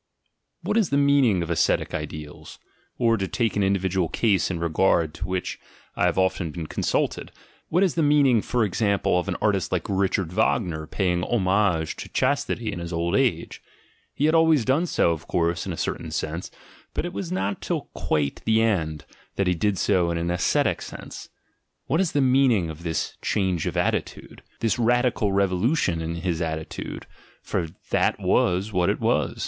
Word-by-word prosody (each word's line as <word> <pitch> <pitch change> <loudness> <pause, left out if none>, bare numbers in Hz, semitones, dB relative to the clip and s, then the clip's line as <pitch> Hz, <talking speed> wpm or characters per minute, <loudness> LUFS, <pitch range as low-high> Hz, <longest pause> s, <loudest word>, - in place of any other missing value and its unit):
What - - 0
is 215 -7 +2
the 140 - +1
meaning 140 -10 +3
of 85 - -4
ascetic 85 - +1
ideals? 75 -1 -7 0.4
Or, 115 -2 +3
to 95 -1 -2
take 115 +2 -1
an 100 - +1
individual 95 -3 +1
case 100 -6 +1
in 90 -3 -3
regard 85 -1 +2
to 95 - -5
which 95 0 -3 0.4
I - - +1
have 90 - +1
often 95 -2 +1
been 80 +1 -6
con - - -4
sulted, - - 0 0.4
what 180 +4 +3
is 185 - +2
the 165 - 0
meaning, 145 -6 +4
for 120 +2 0
example, 100 -2 +1
of 90 - -4
an 95 - -1
artist 100 -4 +1
like - - -1
Richard 95 -3 0
Wagner 90 -7 0
paying 90 0 0
homage 95 -6 +1
to - - -8
chastity - - 0
in - - -5
his 85 0 -6
old 85 0 -1
age? - - 0 0.5
He 145 - +1
had 155 - +3
always 160 -6 +4
done 145 +7 +2
so, 85 - +2
of 80 -1 -5
course, 85 0 0
in - - -2
a - - -5
certain - - -3
sense, - - -4 0.5
but - - -1
it 175 - -5
was 180 -3 -5
not 100 - -2
till - - -2
quite 75 -2 -1
the 110 0 +3
end, 80 -10 0 0.3
that 100 - +1
he 90 - +2
did 95 +3 0
so 90 -4 +2
in 85 - -1
an 85 +1 -1
ascetic 90 - +1
sense. - - -9 0.6
What 165 - +1
is 185 - -1
the 145 - +2
meaning 125 -10 +3
of 80 +1 -11
this 80 -2 -3
"change 95 -5 0
of - - -3
at - - +2
titude," - - -6 0.2
this 115 0 +1
radical 120 -3 +2
revolution 95 - +1
in 80 +1 -3
his 85 -1 -2
attitude 80 -1 -5 0.2
— - - -29
for 85 - -2 0.2
that - - +2
was 95 +4 +1
what 90 -1 +2
it - - 0
was? - - 0
95 Hz, 190 wpm, -24 LUFS, 85-115 Hz, 0.6 s, meaning